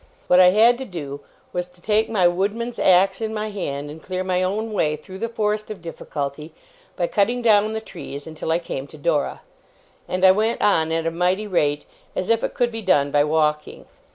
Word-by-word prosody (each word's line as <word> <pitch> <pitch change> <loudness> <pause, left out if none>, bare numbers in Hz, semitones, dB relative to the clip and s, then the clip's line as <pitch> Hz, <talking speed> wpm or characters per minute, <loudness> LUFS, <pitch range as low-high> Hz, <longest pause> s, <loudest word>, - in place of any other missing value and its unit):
What 180 - +5
I 185 - +8
had 230 +5 +5
to 265 - -5
do, 145 - -6 0.3
was, 180 0 -2
to 180 0 -22
take 215 +4 +1
my 190 -6 +3
woodman's 205 +7 -2
axe 190 +3 +4
in 220 0 -3
my 215 0 -3
hand, 145 -7 -4
and 160 +1 -11
clear 185 +2 -3
my 185 -1 0
own 215 +4 -2
way 150 -6 +1
through 185 +5 -11
the 230 - -2
forest 215 -2 -1
of 215 -3 -6
difficulty, 150 -2 -6 0.4
by 175 - 0
cutting 235 +7 0
down 215 -2 +4
the 220 - -3
trees 145 -8 -9
until 160 0 -5
I 165 - +3
came 140 -5 -5
to 155 - -13
Dora. 150 -1 -1 0.7
And 185 +1 +1
I 190 - +9
went 220 +4 +1
on 160 -6 +2
at 165 0 -1
a 165 - 0
mighty 180 +5 0
rate, 150 -7 0 0.3
as 185 - -2
if 230 - +2
it - - -2
could 240 -1 +1
be 225 0 -5
done 145 -8 +2
by 145 0 +4
walking. 150 0 0
185 Hz, 210 wpm, -22 LUFS, 160-215 Hz, 0.7 s, I